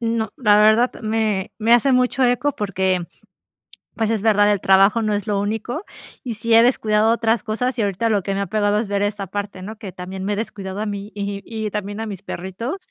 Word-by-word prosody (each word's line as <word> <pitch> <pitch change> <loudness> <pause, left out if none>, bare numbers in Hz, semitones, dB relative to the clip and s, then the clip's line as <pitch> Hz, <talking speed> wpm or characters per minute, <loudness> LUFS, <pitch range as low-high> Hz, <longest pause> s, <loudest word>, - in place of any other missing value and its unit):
No, 225 -2 -1
la 210 -5 +4
verdad 220 +4 +4
me 215 -3 -1
me 225 +2 +2
hace 245 +3 +5
mucho 255 +1 +2
eco 250 +4 +2
porque, 190 -3 -1 0.9
pues, 225 -1 0
es 220 -3 0
verdad, 210 -1 +4
el 205 - +1
trabajo 195 +4 +4
no 215 -1 0
es 205 -1 -2
lo 205 -2 0
único 225 - -3 0.4
y 240 -3 -4
sí 230 +1 -1
he 230 +1 +8
descuidado 220 -3 +3
otras 230 -1 +1
cosas, 245 +3 -2
y - - +3
ahorita 205 +3 0
lo 205 -4 +1
que 195 - -2
me 200 - -1
ha 200 - -1
pegado 205 +1 +1
es 215 - -2
ver 200 0 0
esta 205 -1 -2
parte, 200 0 -5
¿no?, 215 +3 -8
que 205 -3 -8
también 185 +1 -7
me 205 - 0
he - - -1
descuidado 200 -2 -5
a 215 - -2
mí, 205 0 -5
y 200 -1 -4
y 220 -2 -4
también 205 0 -4
a - - -3
mis 200 -4 -7
perritos, 190 - -5
210 Hz, 230 wpm, -21 LUFS, 200-225 Hz, 0.9 s, he